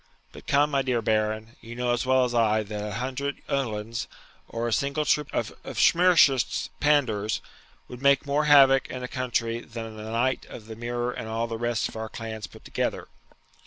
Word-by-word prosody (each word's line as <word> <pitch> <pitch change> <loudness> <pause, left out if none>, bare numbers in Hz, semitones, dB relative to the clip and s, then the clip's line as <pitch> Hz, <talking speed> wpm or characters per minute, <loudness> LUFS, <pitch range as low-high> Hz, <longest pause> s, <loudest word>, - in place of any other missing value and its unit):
But - - -13
come, 145 +1 +3
my 140 -1 +2
dear 130 -3 0
Baron, 110 +1 -1
you 115 0 -9
know 125 0 0
as 120 +1 -2
well 130 0 +4
as 125 -1 -1
I 110 -2 +2
that 105 0 -5
a 105 - -5
hundred 135 +4 -3
Uhlans, 115 -2 -2 0.4
or 115 +1 -3
a 115 - 0
single 140 +4 0
troop 150 -1 +1
of - - -2 0.2
Schmirschitz's 165 -7 +4
Pandours, 115 -8 +2 0.5
would 125 0 -10
make 140 +1 +4
more 145 +2 +1
havoc 135 -2 +6
in 130 -1 -6
a - - -3
country 120 -2 -1
than 115 -2 -8
the 110 +1 -7
knight 125 +3 0
of 110 - -10
the 110 0 -8
mirror 120 +1 -2
and 110 - -6
all 115 +1 -1
the 115 -1 -4
rest 120 -1 0
of - - -12
our 110 0 -5
clans 110 -3 -6
put - - -16
together.' - - -3
120 Hz, 195 wpm, -26 LUFS, 110-135 Hz, 0.5 s, havoc